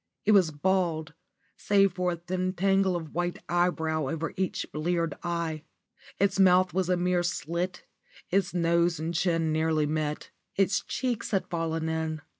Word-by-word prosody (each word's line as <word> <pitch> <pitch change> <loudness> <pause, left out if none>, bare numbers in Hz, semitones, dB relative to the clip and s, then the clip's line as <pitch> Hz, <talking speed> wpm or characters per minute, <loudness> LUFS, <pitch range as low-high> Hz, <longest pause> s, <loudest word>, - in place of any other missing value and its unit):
It 215 - +4
was 190 -6 +5
bald, 160 -1 0 0.4
save 195 -2 +3
for 180 -1 0
a - - -3
thin 185 +2 -3
tangle 195 0 +2
of 160 -3 -5
white 175 +1 -1
eyebrow 160 -4 0
over 165 +2 -3
each 190 -1 -2
bleared 165 0 -1
eye. 170 -3 -2 0.6
Its 200 0 +1
mouth 185 -1 +5
was 185 -1 0
a 180 - +3
mere 180 0 +1
slit, 175 +1 -3 0.5
its 195 -1 +2
nose 170 -1 +2
and 165 +2 -3
chin 165 -2 +1
nearly 155 -1 +1
met, 150 0 -3 0.2
its 195 -1 +2
cheeks 250 -4 -3
had 195 -3 0
fallen 165 -1 -2
in. 160 -1 -2
175 Hz, 155 wpm, -28 LUFS, 160-185 Hz, 0.6 s, was